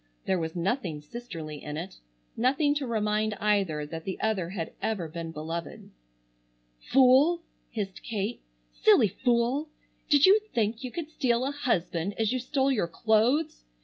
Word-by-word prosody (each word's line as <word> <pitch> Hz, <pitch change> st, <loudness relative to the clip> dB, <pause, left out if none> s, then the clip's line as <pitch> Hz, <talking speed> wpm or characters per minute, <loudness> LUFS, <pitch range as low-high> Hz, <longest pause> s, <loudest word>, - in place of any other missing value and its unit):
There 190 Hz, -, +1 dB
was 160 Hz, 0 st, -4 dB
nothing 175 Hz, -, -1 dB
sisterly 155 Hz, -4 st, -8 dB
in 150 Hz, 0 st, -5 dB
it, 175 Hz, +4 st, -6 dB, 0.4 s
nothing 275 Hz, +5 st, +2 dB
to 290 Hz, -3 st, -2 dB
remind 215 Hz, -1 st, 0 dB
either 195 Hz, -9 st, +1 dB
that 160 Hz, +2 st, -7 dB
the 190 Hz, -, -5 dB
other 200 Hz, -6 st, 0 dB
had 175 Hz, -4 st, -5 dB
ever 200 Hz, -7 st, -1 dB
been 165 Hz, +1 st, -6 dB
beloved. 165 Hz, +2 st, -6 dB, 0.9 s
"Fool!" 270 Hz, -, +4 dB, 0.3 s
hissed 200 Hz, -4 st, -5 dB
Kate. 220 Hz, 0 st, -3 dB, 0.3 s
"Silly -, -, +5 dB
fool! 245 Hz, -, 0 dB, 0.4 s
Did 290 Hz, -2 st, +6 dB
you 395 Hz, +3 st, +7 dB, 0.2 s
think 225 Hz, +1 st, 0 dB
you 255 Hz, -, -3 dB
could 315 Hz, +1 st, -5 dB
steal 250 Hz, -4 st, +1 dB
a 275 Hz, -, -1 dB
husband 200 Hz, -, -1 dB
as 220 Hz, +1 st, +1 dB
you 255 Hz, -, 0 dB
stole 270 Hz, +2 st, +1 dB
your 210 Hz, -10 st, +1 dB
clothes? 230 Hz, -, +1 dB
215 Hz, 150 wpm, -28 LUFS, 170-255 Hz, 0.9 s, you